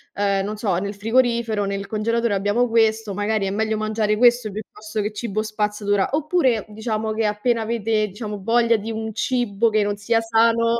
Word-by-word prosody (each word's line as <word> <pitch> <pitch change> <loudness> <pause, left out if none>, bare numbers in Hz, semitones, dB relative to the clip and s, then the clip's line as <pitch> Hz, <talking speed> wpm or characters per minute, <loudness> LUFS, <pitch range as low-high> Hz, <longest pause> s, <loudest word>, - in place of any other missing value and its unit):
uhm, 200 -1 +1
non 210 +1 -4
so, 205 -4 0
"Nel 200 +3 -3
frigorifero, 225 -1 +1
nel 200 0 -3
congelatore, 230 +1 0
abbiamo 205 +5 +1
questo, 220 -2 +2
magari 205 0 -1
è 190 - -2
meglio 220 +1 0
mangiare 215 0 0
questo, 240 -1 +4
piuttosto 215 +1 -6
che 210 - -2
cibo 215 -1 -3
spazzatura." 210 -2 -1
Oppure, 295 - +1
diciamo, 220 0 -3
che 220 0 0
appena 220 +3 0
avete, 220 -1 0
diciamo 210 0 -6
voglia 230 +2 +3
di 220 +2 -5
un 220 0 -4
cibo, 235 -2 0
che 215 -1 +2
non 205 0 -2
sia 225 +3 +1
sano, 230 +1 +2
215 Hz, 180 wpm, -22 LUFS, 205-230 Hz, -, questo